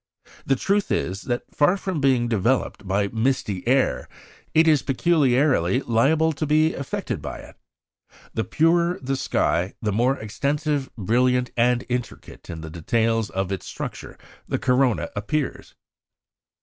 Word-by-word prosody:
The 135 - +3
truth 200 +9 0
is, 95 +3 -1
that 120 0 -1
far 165 +6 +3
from 190 -6 -3
being 130 -3 +3
developed 115 -1 0
by 100 +1 +1
misty 110 -4 -1
air, 125 - +1 0.4
it 160 +1 +4
is 150 -4 +5
peculiarly 135 - +2
liable 145 +8 +2
to 150 +1 -3
be 155 +2 +3
effaced 140 - -4
by - - -6
it. - - -13 0.8
The 110 - -1
purer 170 +5 +2
the 135 +1 -2
sky, 90 -7 0
the 105 - -1
more 125 +6 +2
extensive, 140 +6 -2
brilliant, 125 +4 +1
and 125 +1 +2
intricate 125 -1 -6
in 80 -1 -6
the 80 -1 -8
details 115 +6 0
of 95 0 -3
its 95 - -4
structure - - -7 0.3
the - - -1
corona 125 -2 +1
appears. 130 +8 -3
125 Hz, 140 wpm, -23 LUFS, 110-145 Hz, 0.8 s, is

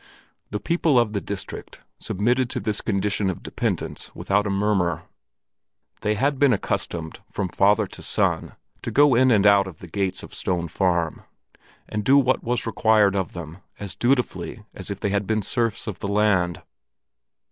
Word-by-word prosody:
The 105 - -3
people 160 - +2
of 115 -3 +1
the 100 - -1
district 100 -2 -6 0.2
submitted 120 +5 0
to - - -2
this 105 +1 -1
condition 100 -1 0
of 95 - -5
dependence - - -3
without 105 +1 +1
a - - -1
murmur. 100 -4 +1 1.0
They 105 0 +1
had 135 +5 0
been 145 -2 +5
accustomed, 85 -5 -3
from 95 - -2
father 105 +4 +3
to - - -11
son, - - 0 0.3
to - - -4
go 145 -1 +5
in 130 +2 +5
and 105 -4 +4
out 100 -1 +6
of 90 -5 -9
the - - -11
gates 95 +2 -2
of - - -11
Stone 85 -2 -2
Farm, 85 -2 0 0.7
and 105 -1 -3
do 135 +6 +5
what 130 -2 +2
was 120 +1 -1
required 105 -2 +3
of 95 -3 -2
them, 85 0 -8 0.2
as 100 -4 -5
dutifully 120 -3 -1
as 95 - -7
if 100 - -4
they 100 - -1
had 100 0 -1
been 110 -1 0
serfs 115 +1 -1
of 105 -4 -5
the - - -3
land. 100 -4 +1
105 Hz, 175 wpm, -24 LUFS, 95-115 Hz, 1.0 s, out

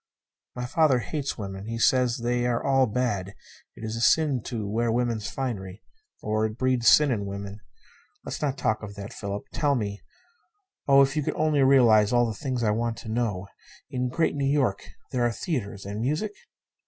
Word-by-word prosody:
"My 125 0 -3
father 145 0 +3
hates 140 +3 -3
women. 95 -1 -6
He 115 0 -3
says 125 0 +3
they 120 0 +1
are 120 -1 0
all 135 -1 +3
bad. 105 -4 -2 0.4
It - - -11
is 110 0 -3
a 115 - -4
sin 145 0 +3
to 110 -4 -4
wear 115 +3 0
woman's 115 -4 -1
finery; 100 -6 -5 0.4
or 110 0 0
it 110 +1 -9
breeds 130 -2 +1
sin 150 -2 +6
in 100 -4 -2
women. 100 +1 -6 0.7
Let's - - -5
not 140 -2 -1
talk 110 -4 0
of 105 -2 -8
that. 100 +3 -8
Philip, 100 -1 -5
tell 145 -2 +1
me 105 -4 -3 0.9
oh, 140 0 +7
if 135 +2 -1
you 155 - +1
could - - -2
only 155 -2 +2
realize 120 -6 +5
all 120 -1 +4
the 115 - -2
things 130 +1 -3
I 105 - +3
want 115 +1 -1
to 115 - -9
know. 110 -5 -1 0.5
In 125 -2 -1
Great 160 +6 +1
New 140 -1 0
York, 125 -9 0 0.2
there 125 -2 0
are 120 - +2
theatres 110 - -4
and 100 +2 -4
music?" 155 - -1
120 Hz, 190 wpm, -26 LUFS, 105-135 Hz, 0.9 s, oh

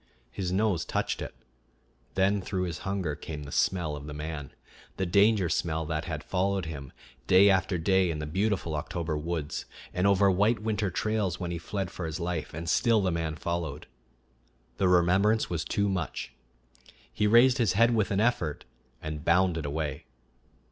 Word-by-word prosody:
His 90 -3 -3
nose 95 -3 +1
touched - - -2
it; - - -6 0.8
then 95 +1 +2
through 95 0 -2
his 85 -4 -4
hunger 95 -5 -2
came 75 0 -7
the 70 - -9
smell 85 -2 +1
of 75 0 -8
the 75 - -7
man 75 -2 -5 0.5
the 95 - 0
danger 100 +1 +4
smell 80 -1 -1
that 80 +1 -2
had 75 -2 -4
followed 95 +1 0
him 70 -5 -7 0.4
day 100 +2 +7
after 95 -1 +1
day 95 +2 +2
in 80 - -2
the 75 - -4
beautiful 95 +1 -1
October 80 +1 -3
woods, 80 -1 -3 0.3
and 90 +2 +2
over 100 0 +4
white 105 +5 +3
winter 105 -2 -1
trails 105 -1 -1
when 90 -2 -3
he 85 - -3
fled 95 +1 -4
for 90 -3 -5
his 80 +1 -4
life, 85 -3 -3
and 80 +2 -6
still 115 +7 +3
the 95 -2 +1
man 80 -2 -2
followed. 80 -2 -3 0.9
The 95 - +2
remembrance 95 +5 +3
was 85 -1 -1
too 100 0 0
much. 95 -4 -3 0.8
He 105 - +1
raised 120 +4 +6
his 110 -6 +3
head 115 +4 +4
with 110 -3 +1
an 95 - 0
effort 105 -10 0 0.4
and 75 -1 -5
bounded 85 -3 +2
away. 75 -1 -3
90 Hz, 175 wpm, -28 LUFS, 80-100 Hz, 0.9 s, day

